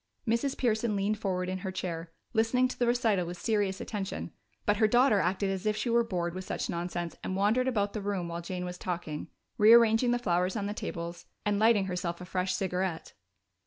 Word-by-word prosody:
Mrs. 235 Hz, +5 st, +1 dB
Pearson 225 Hz, -3 st, +1 dB
leaned 205 Hz, +2 st, 0 dB
forward 185 Hz, -3 st, -1 dB
in 185 Hz, 0 st, -3 dB
her 190 Hz, 0 st, -4 dB
chair, 170 Hz, -2 st, -4 dB, 0.2 s
listening 235 Hz, +3 st, +3 dB
to 255 Hz, -, -8 dB
the 245 Hz, -, +2 dB
recital 225 Hz, -7 st, +2 dB
with 175 Hz, +1 st, -6 dB
serious 205 Hz, -2 st, 0 dB
attention, 200 Hz, -3 st, -4 dB, 0.3 s
but 210 Hz, -1 st, +3 dB
her 220 Hz, 0 st, +4 dB
daughter 240 Hz, -1 st, +4 dB
acted 190 Hz, +2 st, 0 dB
as 190 Hz, +2 st, -3 dB
if 215 Hz, 0 st, +1 dB
she 240 Hz, -, -1 dB
were 235 Hz, 0 st, +4 dB
bored 175 Hz, -6 st, -2 dB
with 185 Hz, +1 st, -5 dB
such -, -, -3 dB
nonsense 175 Hz, 0 st, -3 dB
and 185 Hz, -, -2 dB
wandered 215 Hz, +6 st, +2 dB
about 205 Hz, -5 st, 0 dB
the 215 Hz, -, -3 dB
room 195 Hz, -3 st, -2 dB
while 170 Hz, 0 st, -4 dB
Jane 180 Hz, +1 st, -4 dB
was 180 Hz, 0 st, -6 dB
talking, 170 Hz, -4 st, -4 dB, 0.3 s
rearranging 225 Hz, +2 st, +6 dB
the 245 Hz, -, +3 dB
flowers 180 Hz, -4 st, 0 dB
on 205 Hz, -2 st, -2 dB
the 205 Hz, -, -2 dB
tables 170 Hz, -4 st, -6 dB, 0.2 s
and 205 Hz, -1 st, +1 dB
lighting 220 Hz, -3 st, +4 dB
herself 180 Hz, -2 st, -3 dB
a 180 Hz, -, -7 dB
fresh 185 Hz, +1 st, -1 dB
cigarette. 185 Hz, -2 st, -2 dB
195 Hz, 205 wpm, -30 LUFS, 180-220 Hz, 0.3 s, rearranging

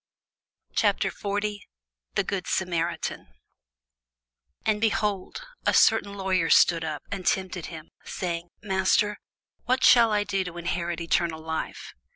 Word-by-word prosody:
CHAPTER -, -, +2 dB
40 205 Hz, 0 st, -3 dB, 0.5 s
THE -, -, +2 dB
GOOD 195 Hz, -2 st, -3 dB
SAMARITAN 175 Hz, -2 st, -2 dB, 1.4 s
AND, 210 Hz, -1 st, +1 dB
behold, 210 Hz, -, -1 dB, 0.2 s
a -, -, +2 dB
certain 200 Hz, 0 st, +4 dB
lawyer 190 Hz, -4 st, 0 dB
stood 165 Hz, -2 st, +5 dB
up, 155 Hz, -3 st, -4 dB
and 195 Hz, -2 st, -4 dB
tempted 185 Hz, -2 st, -1 dB
him, 160 Hz, -2 st, -10 dB
saying, 170 Hz, -1 st, -4 dB
Master, 200 Hz, +1 st, +1 dB, 0.5 s
what 255 Hz, +1 st, +1 dB
shall 235 Hz, -2 st, +7 dB
I 210 Hz, -1 st, +2 dB
do 195 Hz, -2 st, -1 dB
to 180 Hz, -2 st, -8 dB
inherit 170 Hz, 0 st, -2 dB
eternal 165 Hz, -1 st, 0 dB
life? 160 Hz, 0 st, -5 dB
185 Hz, 125 wpm, -26 LUFS, 170-205 Hz, 1.4 s, shall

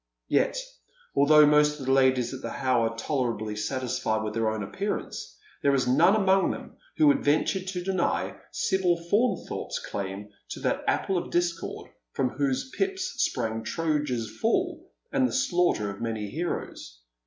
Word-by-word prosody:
Yet, -, -, +2 dB, 0.6 s
although 150 Hz, +2 st, +7 dB
most 150 Hz, 0 st, +4 dB
of 135 Hz, -, -6 dB
the 130 Hz, -, +1 dB
ladies 130 Hz, -2 st, +3 dB
at 130 Hz, -, -7 dB
the -, -, -4 dB
How 130 Hz, -3 st, +1 dB
are 115 Hz, 0 st, -3 dB
tolerably 115 Hz, -5 st, -2 dB
satis 125 Hz, +4 st, -2 dB
fied 110 Hz, 0 st, 0 dB
with 105 Hz, 0 st, -3 dB
their 115 Hz, 0 st, +1 dB
own 110 Hz, -1 st, -3 dB
appearance, 195 Hz, -, -4 dB, 0.2 s
there 140 Hz, -1 st, +3 dB
is 130 Hz, -2 st, +1 dB
none 165 Hz, +11 st, +5 dB
among 195 Hz, -2 st, +3 dB
them -, -, -7 dB, 0.2 s
who 310 Hz, -, +5 dB
would 285 Hz, -2 st, +4 dB
venture 155 Hz, +6 st, +2 dB
to 185 Hz, -1 st, -4 dB
deny 185 Hz, -1 st, 0 dB
Sibyl 185 Hz, -2 st, +1 dB
Faunthorpe's 205 Hz, +9 st, -1 dB
claim 100 Hz, +1 st, -5 dB, 0.2 s
to -, -, -6 dB
that -, -, 0 dB
apple 190 Hz, -2 st, +1 dB
of -, -, -7 dB
discord 175 Hz, -1 st, -2 dB, 0.2 s
from 130 Hz, -, +1 dB
whose 140 Hz, -, -1 dB
pips 385 Hz, -1 st, -2 dB
sprang 110 Hz, 0 st, -1 dB
Troja's 140 Hz, -6 st, -1 dB
fall, 225 Hz, -, 0 dB, 0.2 s
and 265 Hz, -2 st, +3 dB
the -, -, -6 dB
slaughter 180 Hz, -, +1 dB
of 100 Hz, -, -10 dB
many 110 Hz, -3 st, -3 dB
heroes. -, -, -5 dB
145 Hz, 165 wpm, -27 LUFS, 115-185 Hz, 0.6 s, although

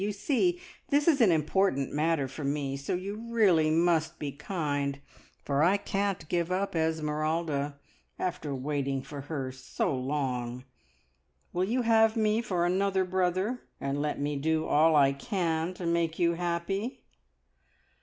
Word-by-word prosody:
You 205 Hz, +1 st, 0 dB
see 300 Hz, -, +1 dB, 0.3 s
this 290 Hz, +2 st, +2 dB
is 290 Hz, -6 st, +4 dB
an 210 Hz, -6 st, +6 dB
important 155 Hz, -2 st, +1 dB
matter 155 Hz, -2 st, +1 dB
for 135 Hz, +3 st, -7 dB
me, 140 Hz, -1 st, -1 dB
so 140 Hz, +5 st, -2 dB
you 200 Hz, +5 st, -5 dB
really 185 Hz, -9 st, +4 dB
must 165 Hz, 0 st, +2 dB
be 145 Hz, -2 st, -4 dB
kind, 145 Hz, -3 st, -2 dB, 0.5 s
for 140 Hz, 0 st, +1 dB
I 180 Hz, +5 st, +4 dB
can't 195 Hz, -4 st, -2 dB
give 170 Hz, +1 st, -1 dB
up 190 Hz, 0 st, -1 dB
Esmeralda, 155 Hz, -2 st, -1 dB, 0.4 s
after 175 Hz, -6 st, -3 dB
waiting 135 Hz, 0 st, -2 dB
for 145 Hz, 0 st, -7 dB
her 135 Hz, -2 st, -4 dB
so 130 Hz, +1 st, -2 dB
long. 125 Hz, -2 st, -2 dB, 0.9 s
Will 180 Hz, +1 st, +1 dB
you 245 Hz, +5 st, 0 dB
have 225 Hz, -1 st, +4 dB
me 215 Hz, 0 st, +2 dB
for 180 Hz, -7 st, 0 dB
another 190 Hz, +1 st, +1 dB
brother, 185 Hz, +6 st, 0 dB, 0.2 s
and 140 Hz, +1 st, -2 dB
let 150 Hz, 0 st, -2 dB
me 145 Hz, +1 st, -1 dB
do 155 Hz, +2 st, 0 dB
all 160 Hz, +1 st, +4 dB
I 140 Hz, -2 st, +5 dB
can 165 Hz, +1 st, -1 dB
to 180 Hz, -, -6 dB
make 170 Hz, -1 st, 0 dB
you 170 Hz, -1 st, +3 dB
happy?" 175 Hz, +7 st, -2 dB
165 Hz, 150 wpm, -29 LUFS, 145-190 Hz, 0.9 s, an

